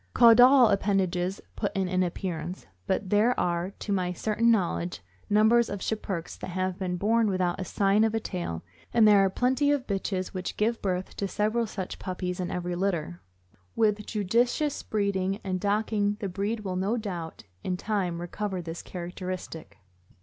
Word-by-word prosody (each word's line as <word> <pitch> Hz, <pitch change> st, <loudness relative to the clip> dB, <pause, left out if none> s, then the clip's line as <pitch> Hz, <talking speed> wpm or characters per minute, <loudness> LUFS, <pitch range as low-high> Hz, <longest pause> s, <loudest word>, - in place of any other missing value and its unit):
Caudal 245 Hz, +1 st, +8 dB
appendages 195 Hz, -2 st, 0 dB, 0.2 s
put 205 Hz, -, -2 dB
in 190 Hz, -1 st, +1 dB
an 185 Hz, 0 st, +1 dB
appear 180 Hz, -1 st, -2 dB
ance, 180 Hz, +4 st, -7 dB, 0.2 s
but 190 Hz, -, -1 dB
there 220 Hz, +4 st, +3 dB
are, 175 Hz, +1 st, 0 dB
to 205 Hz, -, -5 dB
my 180 Hz, -2 st, 0 dB
certain 220 Hz, +5 st, +1 dB
knowledge, 90 Hz, -, 0 dB, 0.3 s
numbers 220 Hz, +3 st, +4 dB
of 200 Hz, -, -4 dB
Schipperkes 190 Hz, -5 st, -3 dB
that -, -, -6 dB
have 185 Hz, +1 st, -2 dB
been 180 Hz, -2 st, -2 dB
born 225 Hz, +4 st, +2 dB
without 185 Hz, -2 st, 0 dB
a -, -, -2 dB
sign 200 Hz, +3 st, +2 dB
of 225 Hz, 0 st, +1 dB
a -, -, +1 dB
tail, 175 Hz, -, -4 dB, 0.3 s
and 220 Hz, -2 st, +6 dB
there 205 Hz, -1 st, +7 dB
are 195 Hz, 0 st, +4 dB
plenty 260 Hz, +8 st, +1 dB
of 285 Hz, -3 st, 0 dB
bitches 195 Hz, -3 st, -2 dB
which 185 Hz, -1 st, -5 dB
give 225 Hz, +2 st, 0 dB
birth 185 Hz, -1 st, -2 dB
to 200 Hz, -, -1 dB
several 215 Hz, +4 st, 0 dB
such 190 Hz, -3 st, -6 dB
puppies 180 Hz, -1 st, -4 dB
in 180 Hz, -, -2 dB
every 180 Hz, 0 st, -3 dB
litter. 175 Hz, -, -2 dB, 0.5 s
With 210 Hz, -2 st, +1 dB
judicious 240 Hz, +8 st, +1 dB
breeding 200 Hz, -2 st, -1 dB
and 185 Hz, -1 st, -2 dB
docking 205 Hz, 0 st, 0 dB
the 200 Hz, -, -2 dB
breed 205 Hz, +4 st, -2 dB
will 185 Hz, -3 st, -3 dB
no 200 Hz, +6 st, 0 dB
doubt, 180 Hz, -7 st, -5 dB, 0.2 s
in 180 Hz, -1 st, -1 dB
time, 190 Hz, -4 st, -1 dB
recover 190 Hz, +2 st, -4 dB
this 165 Hz, -1 st, -6 dB
characteristic. 180 Hz, -, -7 dB
195 Hz, 170 wpm, -27 LUFS, 180-215 Hz, 0.5 s, Caudal